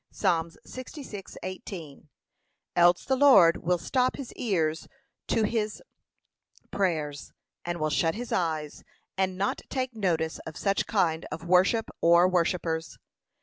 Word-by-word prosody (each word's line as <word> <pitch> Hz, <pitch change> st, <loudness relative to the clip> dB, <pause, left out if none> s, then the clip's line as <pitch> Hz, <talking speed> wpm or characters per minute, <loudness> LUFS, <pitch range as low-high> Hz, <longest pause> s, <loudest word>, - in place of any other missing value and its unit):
(Psa. 165 Hz, -2 st, +1 dB, 0.2 s
66:18) 190 Hz, -, -8 dB, 0.7 s
Else 175 Hz, 0 st, +4 dB
the 265 Hz, -, +2 dB
Lord 255 Hz, -12 st, +7 dB
will 180 Hz, +1 st, 0 dB
stop 255 Hz, -, 0 dB
his 270 Hz, -4 st, -8 dB
ears 165 Hz, -8 st, -1 dB, 0.4 s
to 225 Hz, -, +1 dB
his 215 Hz, -1 st, -1 dB, 0.9 s
prayers, 155 Hz, -7 st, -2 dB, 0.3 s
and 175 Hz, 0 st, -3 dB
will 155 Hz, 0 st, 0 dB
shut 165 Hz, +3 st, +1 dB
his 240 Hz, +2 st, -6 dB
eyes, 155 Hz, -4 st, -2 dB, 0.3 s
and 190 Hz, -1 st, -1 dB
not 200 Hz, +1 st, -1 dB
take 255 Hz, -2 st, -3 dB
notice 170 Hz, -6 st, -1 dB
of 160 Hz, -1 st, -9 dB
such 195 Hz, -1 st, 0 dB
kind 170 Hz, -6 st, +1 dB
of 165 Hz, -, -6 dB
worship 185 Hz, +6 st, +3 dB
or 170 Hz, +1 st, +6 dB
worshippers. 170 Hz, -2 st, -1 dB
180 Hz, 125 wpm, -27 LUFS, 165-210 Hz, 0.9 s, Lord